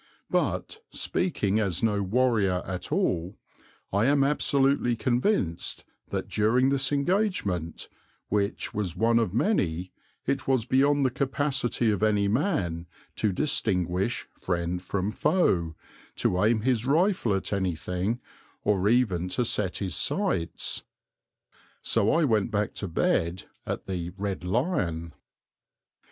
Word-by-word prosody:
But, 435 - -1
speaking 110 - 0
as 100 -2 0
no 105 -3 +2
warrior 100 -3 +2
at 90 -1 -5
all, 90 +3 0 0.6
I 105 +4 +3
am 140 0 +4
absolutely 140 -3 +2
convinced 120 - 0 0.2
that - - -3
during 120 +5 +2
this 135 0 +1
engagement, 140 - 0 0.4
which 100 0 -1
was 95 -5 -2
one 115 +4 +3
of 115 -6 0
many, 95 - 0 0.3
it 135 0 -1
was 130 -4 +2
beyond 140 +2 +3
the 130 - +2
capacity 135 -3 0
of 105 - -1
any 105 -2 +3
man 100 - 0 0.3
to 105 - +1
distinguish 95 - 0
friend 90 0 -1
from 95 +2 -2
foe, 100 - +1 0.4
to 90 +2 +1
aim 110 0 +3
his 120 -1 +1
rifle 155 - +2
at 95 - -3
anything, 95 +3 -1 0.4
or 100 -1 +2
even 100 -8 +2
to 125 +6 0
set 100 -5 0
his 95 -4 -3
sights. 85 0 -1 1.0
So 100 - +2
I 165 +1 +3
went 110 -6 +2
back 105 -2 -1
to 100 - -2
bed 85 +1 0 0.2
at - - -3
the 90 -3 -3
"Red 100 -2 -3
Lion." 90 - -1
105 Hz, 125 wpm, -27 LUFS, 90-130 Hz, 1.0 s, am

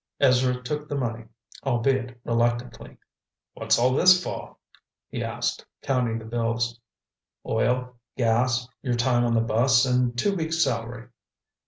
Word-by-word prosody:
Ezra 125 -2 +3
took 150 +3 -4
the 145 - -2
money, 115 -3 -3 0.4
albeit 125 -1 0
reluctantly. 120 +1 -1 0.6
"What's - - +1
all 125 +2 +3
this 180 +5 +6
for?" - - -6 0.5
he - - -4
asked, - - -3 0.2
counting 125 -4 0
the 110 - -9
bills. 115 0 -2 0.7
"Oil, 125 0 0 0.2
gas, 120 +1 +1
your 125 -3 -1
time 120 0 +2
on 120 -1 +1
the 115 - +3
bus 120 +3 +3
and 125 -1 +1
two 200 +10 +1
weeks' 165 -1 0
salary." 120 -2 -3
125 Hz, 135 wpm, -25 LUFS, 120-130 Hz, 0.7 s, this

